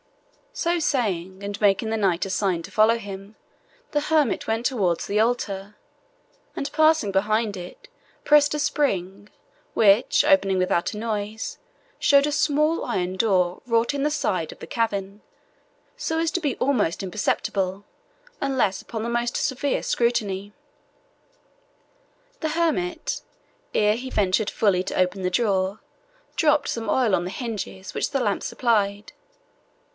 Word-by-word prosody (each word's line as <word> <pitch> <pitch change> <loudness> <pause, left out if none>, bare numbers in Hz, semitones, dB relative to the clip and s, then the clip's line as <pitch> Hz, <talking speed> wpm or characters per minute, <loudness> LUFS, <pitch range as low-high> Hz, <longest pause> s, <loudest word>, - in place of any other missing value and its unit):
So 350 -8 0
saying, 195 - -1
and 205 +1 -5
making 205 +2 +2
the - - +1
knight 190 -4 +1
a - - -5
sign 185 -4 0
to - - -10
follow 220 +2 +4
him, 200 -1 -9 0.6
the 295 - +1
hermit 300 -3 +1
went 225 +2 -1
towards 195 -11 +1
the 205 +1 0
altar, 210 -3 -1 0.8
and 280 - -3
passing 310 -8 +3
behind 210 +2 +1
it, 180 -1 -10 0.4
pressed 295 -1 +5
a - - -2
spring, 205 -10 -1 0.5
which, 210 +1 +4
opening 285 -11 +4
without 185 0 +1
noise, 215 0 -4 0.4
showed 280 0 +5
a - - -1
small 305 +2 +1
iron 185 -1 -2
door 185 -4 +1
wrought 230 +1 +1
in 280 -1 -1
the 300 - +2
side 185 - -1
of - - -13
the - - -9
cavern, 205 -3 -2 0.7
so 320 - -2
as 330 0 +1
to 355 - -1
be 290 -5 -1
almost 235 -12 +1
imperceptible, 195 0 -1 0.6
unless 260 -9 0
upon 220 -1 -5
the - - -2
most 240 0 -1
severe 280 0 0
scrutiny. 205 -4 0 1.9
The 315 - 0
hermit, 335 +1 -1 0.5
ere 210 0 +3
he 255 +3 -6
ventured 205 -1 +1
fully 190 -4 +2
to - - -3
open 185 +1 +1
the 180 - 0
door, 195 -1 0 0.6
dropped 300 -3 +2
some 225 -2 -3
oil 230 -4 +3
on 175 - -1
the 180 - -4
hinges, 210 -5 -5
which - - -1
the 275 - 0
lamp 210 -5 0
supplied. 205 -4 0
215 Hz, 145 wpm, -24 LUFS, 195-275 Hz, 1.9 s, pressed